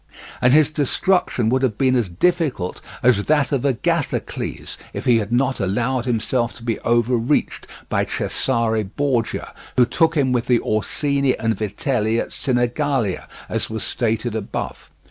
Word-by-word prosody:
And 125 Hz, -, +5 dB
his 155 Hz, +1 st, +5 dB
destruction 150 Hz, -, +1 dB
would 130 Hz, +2 st, +2 dB
have 120 Hz, -6 st, 0 dB
been 130 Hz, -1 st, +3 dB
as 120 Hz, -6 st, +1 dB
difficult 140 Hz, -, 0 dB, 0.2 s
as 115 Hz, -5 st, +4 dB
that 150 Hz, -2 st, +2 dB
of 140 Hz, -4 st, 0 dB
Agathocles 135 Hz, -5 st, -2 dB, 0.2 s
if -, -, -5 dB
he 120 Hz, -2 st, +5 dB
had 105 Hz, +1 st, -4 dB
not 130 Hz, +2 st, +1 dB
allowed 115 Hz, +6 st, 0 dB
himself 120 Hz, 0 st, 0 dB
to 115 Hz, -, -13 dB
be 115 Hz, -2 st, -1 dB
overreached 120 Hz, +3 st, +1 dB, 0.2 s
by -, -, 0 dB
Cesare 115 Hz, -4 st, 0 dB
Borgia, 120 Hz, +3 st, -2 dB, 0.2 s
who 125 Hz, -, +6 dB
took 165 Hz, +4 st, +1 dB
him 135 Hz, -3 st, +2 dB
with 120 Hz, -2 st, 0 dB
the 125 Hz, -2 st, +4 dB
Orsini 140 Hz, +5 st, 0 dB
and 115 Hz, 0 st, 0 dB
Vitelli 110 Hz, -, -1 dB
at -, -, -3 dB
Sinigalia, 125 Hz, -3 st, 0 dB, 0.2 s
as -, -, -3 dB
was 110 Hz, -1 st, -4 dB
stated 115 Hz, 0 st, -1 dB
above. 110 Hz, -3 st, -5 dB
120 Hz, 150 wpm, -21 LUFS, 110-135 Hz, 0.2 s, who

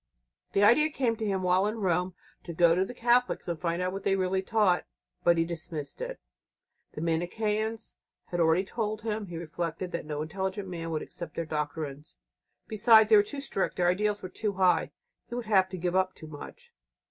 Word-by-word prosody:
The 200 Hz, -, +3 dB
idea 300 Hz, +9 st, +6 dB
came 255 Hz, -6 st, 0 dB
to 220 Hz, -, -3 dB
him 190 Hz, -2 st, -1 dB
while 185 Hz, +2 st, +3 dB
in 215 Hz, +2 st, -3 dB
Rome 180 Hz, -2 st, 0 dB, 0.3 s
to 170 Hz, -, -6 dB
go 170 Hz, 0 st, +5 dB
to 185 Hz, +2 st, +2 dB
the 245 Hz, +6 st, -7 dB
Catholics 245 Hz, -1 st, +2 dB
and 170 Hz, -2 st, -3 dB
find 170 Hz, +1 st, -1 dB
out 185 Hz, 0 st, -1 dB
what 195 Hz, -, -4 dB
they 195 Hz, -, +2 dB
really 190 Hz, 0 st, 0 dB
taught. 205 Hz, -2 st, +2 dB, 0.4 s
But 170 Hz, -1 st, +4 dB
he 165 Hz, -, +2 dB
dismissed 160 Hz, -4 st, -5 dB
it. -, -, -5 dB, 0.7 s
The -, -, -6 dB
Manicheans 210 Hz, +7 st, -1 dB, 0.3 s
had 175 Hz, -, -2 dB
already 165 Hz, +2 st, +4 dB
told 215 Hz, +1 st, -3 dB
him, 215 Hz, -2 st, -2 dB
he 170 Hz, -2 st, -6 dB
reflected, 170 Hz, +2 st, -4 dB
that 170 Hz, -3 st, -4 dB
no 150 Hz, 0 st, -2 dB
intelligent 190 Hz, +4 st, -3 dB
man 165 Hz, -2 st, -5 dB
could 155 Hz, -2 st, -2 dB
accept 170 Hz, -4 st, -8 dB
their 165 Hz, -, -2 dB
doctrines. 150 Hz, -, -4 dB, 0.5 s
Besides, 220 Hz, 0 st, +5 dB
they -, -, +9 dB
were 205 Hz, -, +8 dB
too 275 Hz, +7 st, -6 dB
strict; 195 Hz, -8 st, -1 dB
their 175 Hz, -1 st, +2 dB
ideals 205 Hz, +3 st, 0 dB
were 185 Hz, -, -5 dB
too 210 Hz, +2 st, -2 dB
high; 185 Hz, -2 st, +3 dB, 0.4 s
he 240 Hz, -, -6 dB
would 245 Hz, -1 st, -4 dB
have 190 Hz, -3 st, +3 dB
to 185 Hz, -, -6 dB
give 175 Hz, +1 st, -1 dB
up 185 Hz, 0 st, +1 dB
too 160 Hz, -, -11 dB
much. 150 Hz, -2 st, -11 dB
185 Hz, 205 wpm, -29 LUFS, 170-210 Hz, 0.7 s, they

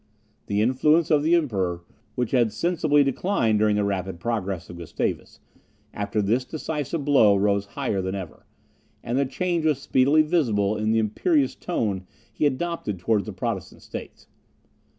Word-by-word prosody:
The 105 Hz, +1 st, +1 dB
influence 150 Hz, +7 st, +3 dB
of 150 Hz, -2 st, +4 dB
the 160 Hz, +3 st, +3 dB
Emperor, 95 Hz, -, -1 dB, 0.3 s
which 125 Hz, -3 st, -1 dB
had 120 Hz, -4 st, +3 dB
sensibly 155 Hz, -, +2 dB
declined 135 Hz, -, +1 dB
during 105 Hz, -1 st, +3 dB
the 105 Hz, -, +1 dB
rapid 95 Hz, -3 st, -2 dB
progress 100 Hz, -5 st, -3 dB
of 90 Hz, -, -10 dB
Gustavus, 85 Hz, -2 st, -4 dB, 0.5 s
after 100 Hz, +1 st, -1 dB
this 115 Hz, +6 st, +1 dB
decisive 150 Hz, +1 st, -4 dB
blow 120 Hz, -9 st, +5 dB
rose 100 Hz, 0 st, +1 dB
higher 95 Hz, -, -1 dB
than 95 Hz, +1 st, -3 dB
ever; 90 Hz, -6 st, -8 dB, 0.6 s
and 120 Hz, -, -2 dB
the 140 Hz, -, +1 dB
change 170 Hz, +4 st, -1 dB
was 155 Hz, -3 st, +2 dB
speedily 140 Hz, +3 st, +3 dB
visible 115 Hz, -, +1 dB
in 110 Hz, 0 st, -1 dB
the 115 Hz, -, +2 dB
imperious 275 Hz, -, +1 dB
tone 100 Hz, -, -3 dB, 0.3 s
he 150 Hz, -, +2 dB
adopted 145 Hz, -, -3 dB
towards 100 Hz, +2 st, 0 dB
the -, -, -4 dB
Protestant -, -, -5 dB
states. -, -, -9 dB
115 Hz, 155 wpm, -24 LUFS, 100-150 Hz, 0.6 s, blow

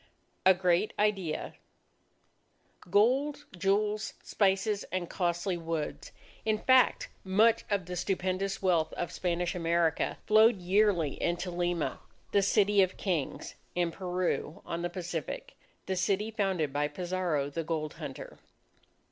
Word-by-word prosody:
A 190 Hz, -, +7 dB
GREAT 180 Hz, +2 st, +1 dB
IDEA 195 Hz, -6 st, 0 dB, 1.4 s
Gold, 265 Hz, +9 st, +2 dB
jewels, 205 Hz, +4 st, 0 dB
spices, 200 Hz, +1 st, +1 dB
and 185 Hz, -2 st, -2 dB
costly 175 Hz, +1 st, -1 dB
woods, 165 Hz, -2 st, -4 dB, 0.3 s
in 215 Hz, -1 st, +1 dB
fact 260 Hz, +3 st, +4 dB
much 220 Hz, +4 st, +3 dB
of 200 Hz, -4 st, 0 dB
the 180 Hz, +1 st, -5 dB
stupendous 190 Hz, +2 st, -1 dB
wealth 170 Hz, -4 st, +2 dB
of 175 Hz, -1 st, -3 dB
Spanish 175 Hz, -1 st, -1 dB
America, 170 Hz, -2 st, +1 dB
flowed 220 Hz, +1 st, +6 dB
yearly 180 Hz, -4 st, +2 dB
into 175 Hz, +1 st, -1 dB
Lima, 175 Hz, -2 st, -1 dB, 0.3 s
"the 200 Hz, -, +4 dB
City 200 Hz, 0 st, +4 dB
of 185 Hz, -, +4 dB
the -, -, -17 dB
Kings" 170 Hz, -8 st, -2 dB, 0.2 s
in 175 Hz, -1 st, +1 dB
Peru, 180 Hz, -3 st, -2 dB
on 170 Hz, -, -3 dB
the 175 Hz, -, -1 dB
Pacific, 175 Hz, -3 st, -5 dB, 0.3 s
the 190 Hz, -, -1 dB
city 200 Hz, +4 st, 0 dB
founded 190 Hz, -9 st, -1 dB
by 145 Hz, +1 st, +1 dB
Pizarro 170 Hz, -3 st, -2 dB
the 165 Hz, +3 st, -3 dB
gold 155 Hz, -2 st, -3 dB
hunter. -, -, -7 dB
185 Hz, 130 wpm, -30 LUFS, 170-205 Hz, 1.4 s, A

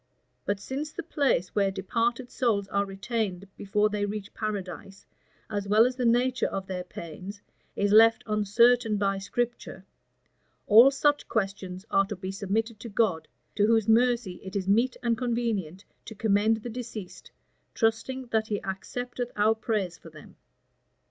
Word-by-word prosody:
But 205 Hz, -1 st, -1 dB
since 280 Hz, +8 st, -5 dB
the 345 Hz, -, -6 dB
place 280 Hz, -, 0 dB
where 200 Hz, -2 st, +2 dB
departed 230 Hz, +6 st, -2 dB
souls 210 Hz, -6 st, 0 dB
are 200 Hz, +1 st, +1 dB
retained 195 Hz, -1 st, -3 dB
before 210 Hz, +1 st, +1 dB
they 210 Hz, -1 st, -2 dB
reach 205 Hz, 0 st, -4 dB
paradise, 195 Hz, -3 st, -5 dB, 0.4 s
as 205 Hz, -2 st, -3 dB
well 215 Hz, +3 st, +5 dB
as 250 Hz, 0 st, -1 dB
the 250 Hz, -2 st, 0 dB
nature 245 Hz, +2 st, +2 dB
of 195 Hz, -1 st, -4 dB
their 185 Hz, -1 st, -4 dB
pains, 180 Hz, +3 st, -9 dB, 0.4 s
is 200 Hz, 0 st, +1 dB
left 225 Hz, +2 st, +6 dB
uncertain 220 Hz, +2 st, +3 dB
by 195 Hz, -1 st, 0 dB
Scripture, 230 Hz, -2 st, -4 dB, 0.8 s
all 230 Hz, +5 st, +8 dB
such 290 Hz, +1 st, +1 dB
questions 195 Hz, -3 st, -3 dB
are 195 Hz, 0 st, +3 dB
to 210 Hz, -, -4 dB
be 185 Hz, 0 st, -5 dB
submitted 215 Hz, +3 st, -2 dB
to 235 Hz, -, -8 dB
God, 195 Hz, -7 st, 0 dB, 0.3 s
to 205 Hz, 0 st, +2 dB
whose 225 Hz, -2 st, +3 dB
mercy 230 Hz, -4 st, +2 dB
it 190 Hz, +1 st, -8 dB
is 190 Hz, -2 st, -2 dB
meet 230 Hz, +5 st, +2 dB
and 230 Hz, -2 st, +1 dB
convenient 225 Hz, -8 st, -2 dB, 0.2 s
to 220 Hz, -, -9 dB
commend 215 Hz, +1 st, +2 dB
the 240 Hz, -, -5 dB
deceased, 225 Hz, -5 st, -8 dB, 0.5 s
trusting 255 Hz, +3 st, 0 dB
that 220 Hz, -1 st, +1 dB
he 205 Hz, -2 st, -1 dB
accepteth 245 Hz, +5 st, -5 dB
our 210 Hz, +1 st, +3 dB
prayers 210 Hz, -6 st, -2 dB
for 165 Hz, -, -13 dB
them." 155 Hz, -1 st, -15 dB
210 Hz, 155 wpm, -27 LUFS, 195-235 Hz, 0.8 s, all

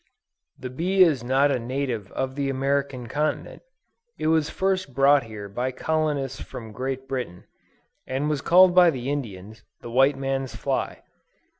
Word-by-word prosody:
The 125 Hz, -, -7 dB
bee 185 Hz, +8 st, +3 dB
is 150 Hz, -9 st, +2 dB
not 135 Hz, +3 st, +3 dB
a 125 Hz, -, 0 dB
native 120 Hz, -4 st, -3 dB
of 130 Hz, 0 st, -2 dB
the 140 Hz, 0 st, -2 dB
American 135 Hz, -1 st, -1 dB
continent; 150 Hz, +6 st, -2 dB, 0.6 s
it -, -, -4 dB
was 160 Hz, -2 st, +1 dB
first 185 Hz, -8 st, -1 dB
brought 140 Hz, 0 st, +5 dB
here 105 Hz, -2 st, -8 dB
by 120 Hz, +6 st, -2 dB
colonists 145 Hz, -2 st, -1 dB
from 110 Hz, -2 st, -8 dB
Great 130 Hz, +3 st, -4 dB
Britain, 125 Hz, -10 st, -5 dB, 0.6 s
and 135 Hz, +3 st, -1 dB
was 150 Hz, -3 st, -1 dB
called 180 Hz, +3 st, +6 dB
by 180 Hz, -1 st, +7 dB
the 130 Hz, -3 st, -3 dB
Indians, 110 Hz, -6 st, -6 dB, 0.2 s
the 120 Hz, -, -8 dB
white 135 Hz, +3 st, +4 dB
man's 135 Hz, -2 st, -3 dB
fly. -, -, -3 dB
135 Hz, 155 wpm, -25 LUFS, 125-145 Hz, 0.6 s, by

